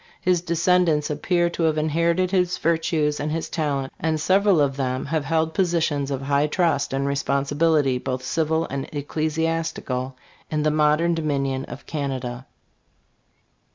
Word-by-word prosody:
His 180 Hz, -2 st, +1 dB
descendants 170 Hz, -3 st, +2 dB
appear 175 Hz, +4 st, +1 dB
to 170 Hz, -, -4 dB
have 155 Hz, -, -2 dB
inherited 170 Hz, +4 st, +1 dB
his 180 Hz, -2 st, +1 dB
virtues 160 Hz, -2 st, 0 dB
and 150 Hz, +1 st, -2 dB
his 165 Hz, +1 st, -3 dB
talent, 140 Hz, -4 st, -2 dB
and 160 Hz, 0 st, 0 dB
several 190 Hz, +2 st, +3 dB
of 140 Hz, -2 st, +2 dB
them 130 Hz, -1 st, -2 dB
have 150 Hz, 0 st, -1 dB
held 160 Hz, +1 st, 0 dB
positions 165 Hz, -6 st, 0 dB
of 135 Hz, -1 st, -3 dB
high 140 Hz, +2 st, +2 dB
trust 150 Hz, -4 st, +1 dB
and 135 Hz, +1 st, -1 dB
responsibility, 140 Hz, 0 st, +1 dB
both 130 Hz, 0 st, -3 dB
civil 160 Hz, +4 st, 0 dB
and 135 Hz, 0 st, -4 dB
ecclesiastical, 155 Hz, -3 st, -2 dB, 0.3 s
in 155 Hz, -1 st, -1 dB
the 155 Hz, -, +2 dB
modern 155 Hz, +3 st, +3 dB
Do 165 Hz, -, -2 dB
minion 135 Hz, -3 st, -1 dB
of -, -, -10 dB
Canada. 130 Hz, -4 st, -4 dB
155 Hz, 150 wpm, -23 LUFS, 140-165 Hz, 0.3 s, several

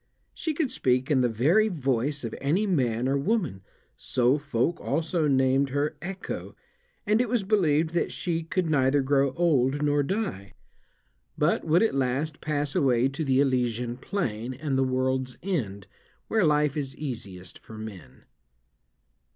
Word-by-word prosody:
She 315 Hz, -2 st, -3 dB
could 290 Hz, -4 st, 0 dB
speak 130 Hz, +2 st, +1 dB
in 135 Hz, -3 st, +4 dB
the 125 Hz, -, +2 dB
very 155 Hz, -, +3 dB
voice 145 Hz, -, -1 dB
of 115 Hz, -, -4 dB
any 165 Hz, +10 st, +1 dB
man 125 Hz, -, +1 dB
or 140 Hz, +1 st, +1 dB
woman, 170 Hz, -, -1 dB, 0.3 s
so 125 Hz, +3 st, +1 dB
folk 140 Hz, +3 st, -1 dB
also 160 Hz, +2 st, 0 dB
named 135 Hz, 0 st, +3 dB
her 145 Hz, +3 st, -1 dB
Echo, 190 Hz, +2 st, -6 dB, 0.5 s
and 215 Hz, +2 st, +3 dB
it 250 Hz, -, -1 dB
was 235 Hz, -3 st, +1 dB
believed 165 Hz, -6 st, +2 dB
that 170 Hz, -, 0 dB
she 165 Hz, -2 st, -2 dB
could 175 Hz, +3 st, -1 dB
neither 140 Hz, -2 st, +2 dB
grow 135 Hz, 0 st, +2 dB
old 145 Hz, -4 st, +2 dB
nor 145 Hz, 0 st, +2 dB
die, 145 Hz, -, -3 dB, 0.8 s
but 150 Hz, +3 st, +1 dB
would 165 Hz, +5 st, +4 dB
at 225 Hz, -, +2 dB
last 135 Hz, +3 st, -1 dB
pass 145 Hz, -2 st, -1 dB
away 130 Hz, -1 st, +3 dB
to 140 Hz, +4 st, -4 dB
the 135 Hz, -2 st, +2 dB
Elysian 125 Hz, -3 st, 0 dB
plain 125 Hz, -, -3 dB
and 140 Hz, 0 st, -2 dB
the 135 Hz, -, +3 dB
world's 130 Hz, 0 st, -1 dB
end, 110 Hz, -, -2 dB, 0.4 s
where 220 Hz, -4 st, +3 dB
life 150 Hz, -2 st, +2 dB
is 135 Hz, -3 st, -4 dB
easiest 100 Hz, -, -6 dB
for 110 Hz, -, -12 dB
men. 100 Hz, -12 st, -10 dB
140 Hz, 155 wpm, -27 LUFS, 125-165 Hz, 0.8 s, in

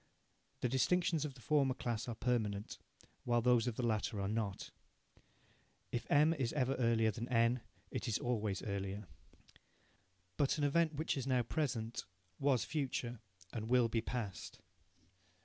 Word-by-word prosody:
The -, -, +2 dB
distinctions 155 Hz, +5 st, +2 dB
of 140 Hz, -3 st, -6 dB
the 125 Hz, -, -14 dB
former 140 Hz, -2 st, +2 dB
class 120 Hz, -3 st, -2 dB
are 120 Hz, -, -3 dB
permanent, 110 Hz, -4 st, -1 dB, 0.4 s
while 120 Hz, -1 st, +2 dB
those 125 Hz, -1 st, +4 dB
of 120 Hz, -, -1 dB
the 125 Hz, -, -1 dB
latter 110 Hz, -1 st, 0 dB
are 100 Hz, -, -1 dB
not. 105 Hz, -2 st, -2 dB, 1.2 s
If 120 Hz, -, -3 dB
M 150 Hz, +3 st, +5 dB
is 135 Hz, -7 st, -1 dB
ever 135 Hz, -3 st, +1 dB
earlier 115 Hz, -2 st, +3 dB
than 120 Hz, +2 st, -5 dB
N, 115 Hz, 0 st, +3 dB, 0.3 s
it -, -, -3 dB
is 110 Hz, -, +1 dB
always 110 Hz, -5 st, -1 dB
earlier. 100 Hz, -1 st, -3 dB, 1.3 s
But 145 Hz, +2 st, +2 dB
an 150 Hz, -, 0 dB
event, 155 Hz, +2 st, +3 dB
which 155 Hz, +3 st, 0 dB
is 135 Hz, -2 st, -3 dB
now 125 Hz, -2 st, +3 dB
present, 115 Hz, -4 st, -2 dB, 0.3 s
was 130 Hz, -5 st, +2 dB
future 125 Hz, -4 st, -2 dB, 0.3 s
and 110 Hz, -1 st, -4 dB
will 125 Hz, -2 st, +4 dB
be 115 Hz, 0 st, +1 dB
past. 110 Hz, -7 st, -4 dB
120 Hz, 150 wpm, -36 LUFS, 110-135 Hz, 1.3 s, M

